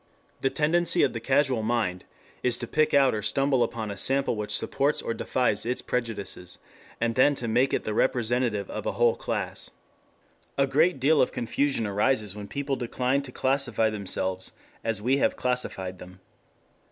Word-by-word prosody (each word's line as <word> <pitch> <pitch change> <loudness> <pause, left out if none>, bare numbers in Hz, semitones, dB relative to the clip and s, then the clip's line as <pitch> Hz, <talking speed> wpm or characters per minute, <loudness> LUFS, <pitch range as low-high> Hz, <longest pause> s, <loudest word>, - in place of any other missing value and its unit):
The 135 - +1
tendency 155 +5 +2
of - - +2
the 115 - -3
casual 130 0 +2
mind 110 -5 -1 0.4
is 125 -1 +2
to 120 - -3
pick 155 +5 +1
out 135 -2 +4
or 105 - -2
stumble 135 +3 +1
upon 110 -3 -2
a 100 - -7
sample 135 +2 +2
which 105 -1 -4
supports 140 +6 0
or - - -2
defies 120 -3 0
its 125 +2 -3
prejudices, 110 -7 -4 0.4
and 115 0 0
then 140 +4 +4
to 120 - -3
make 125 +4 +2
it - - 0
the 110 - -3
representative 120 -3 +1
of 110 - -5
a - - -1
whole 120 -1 +3
class. - - -3 0.9
A 140 - +4
great 155 +4 +2
deal 150 +4 +4
of - - +2
confusion 125 0 0
arises 105 0 0
when 105 -1 -7
people 140 +2 -2
decline 125 +2 -1
to 135 -2 -7
classify 125 -5 +1
themselves 95 -2 -2 0.3
as 110 -2 -1
we 130 +4 +3
have - - +1
classified 95 -7 -1
them. 90 +1 -12
120 Hz, 175 wpm, -26 LUFS, 110-135 Hz, 0.9 s, out